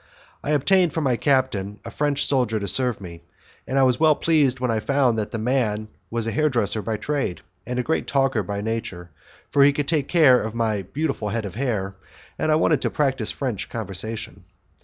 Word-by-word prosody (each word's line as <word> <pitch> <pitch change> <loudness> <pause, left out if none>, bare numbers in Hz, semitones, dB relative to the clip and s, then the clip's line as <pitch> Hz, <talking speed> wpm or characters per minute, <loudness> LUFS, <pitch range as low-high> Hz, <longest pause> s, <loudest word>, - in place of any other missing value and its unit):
I - - -4
obtained 165 +3 +3
from 160 - -1
my 130 -3 +2
captain 115 -7 0
a - - -6
French 145 -1 0
soldier 125 -6 +1
to 100 - -4
serve 125 +3 0
me, 85 -3 -9 0.5
and 135 - -1
I 135 - +5
was 125 -2 +3
well 155 -1 +5
pleased 145 -7 +2
when 125 -2 0
I 110 - 0
found 135 0 +2
that 105 - -2
the 115 - -4
man 110 -3 0 0.2
was 115 -1 -2
a 115 - -1
hairdresser 120 -8 +1
by 110 0 -2
trade, 140 -8 -2 0.3
and 125 0 -3
a 125 - 0
great 160 +5 -1
talker 135 -5 +1
by 100 +1 -4
nature, 105 -6 -4 0.4
for 140 - +3
he 140 +1 +7
could 145 0 -2
take 150 -4 +1
care 145 -8 +5
of 110 0 -5
my 110 -3 0
beautiful 135 - -3
head 110 0 -2
of 100 - -6
hair, 105 -6 -2 0.5
and 155 - +1
I - - +5
wanted 155 -1 +2
to - - 0
practise 130 -6 0
French 125 -8 -3
conversation. 110 -1 -6
125 Hz, 205 wpm, -23 LUFS, 110-140 Hz, 0.5 s, he